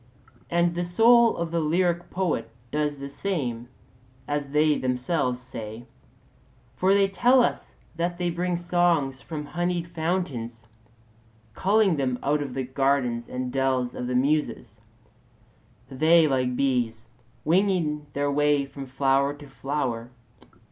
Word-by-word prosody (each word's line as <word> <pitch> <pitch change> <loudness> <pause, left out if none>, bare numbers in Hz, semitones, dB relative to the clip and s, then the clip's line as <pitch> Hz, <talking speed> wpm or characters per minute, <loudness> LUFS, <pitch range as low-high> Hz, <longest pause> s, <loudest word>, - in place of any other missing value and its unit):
And 170 0 +2
the 175 +1 -2
soul 230 +6 +5
of 170 -1 -3
the 170 - 0
lyric 175 +2 0
poet 170 -11 -1 0.2
does 150 -1 -1
the 140 0 -6
same, 140 -8 -3 0.6
as 145 -1 -2
they 150 +1 +3
themselves 125 0 -1
say; 115 -2 -8 0.9
for 190 +2 +3
they 200 -1 +4
tell 245 +6 +4
us - - -3 0.2
that 175 +1 -1
they 175 -1 -1
bring 175 +1 -1
songs 170 -6 +1
from 150 -2 -6
honeyed 175 +2 -2
fountains, 160 -10 -3 0.9
culling 195 - +2
them 130 -3 0
out 145 +1 +1
of 140 -3 -5
the 135 - -1
gardens 130 -2 0
and 125 0 -4
dells 130 -2 0
of 125 - -4
the 125 - -2
Muses; 130 -5 0 1.1
they, 160 +4 +4
like 130 -3 +1
the 125 - -4
bees, 120 -4 0 0.4
winging 165 -4 +1
their 145 0 0
way 145 0 +2
from 135 0 -9
flower 135 +2 +1
to 145 0 -13
flower. 135 -4 -3
145 Hz, 135 wpm, -25 LUFS, 130-175 Hz, 1.1 s, soul